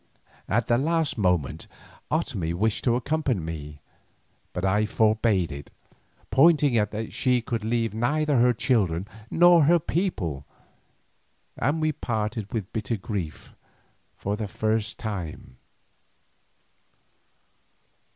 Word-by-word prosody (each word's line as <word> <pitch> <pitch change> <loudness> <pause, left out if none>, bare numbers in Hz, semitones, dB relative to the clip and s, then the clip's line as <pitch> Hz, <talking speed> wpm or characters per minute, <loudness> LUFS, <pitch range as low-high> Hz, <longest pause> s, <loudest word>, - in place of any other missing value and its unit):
At 115 +3 +2
the 120 0 +3
last 160 +1 +1
moment 90 - 0 0.4
Otomie 85 -2 -1
wished 110 +4 0
to 120 -2 +3
accompany 130 -2 0
me, 75 -3 -7 0.7
but 90 - -3
I 105 +3 +2
forbade 110 -5 +2
it, 70 0 -8 0.6
pointing 145 -3 +5
out 105 -2 +2
that 110 +1 -5
she 125 -1 +2
could 115 -1 -3
leave 115 0 0
neither 145 +5 +1
her 125 +1 +5
children 100 -7 0 0.2
nor 175 -2 +6
her 170 +4 +5
people, 130 - -2 1.1
and 145 +7 0
we 155 0 +1
parted 110 -5 -3
with 105 -5 -4
bitter 110 +1 -2
grief 95 -6 -5 0.7
for 100 +1 -2
the 105 -1 -4
first 110 +2 -1
time. 90 - -6
110 Hz, 115 wpm, -26 LUFS, 95-130 Hz, 1.1 s, nor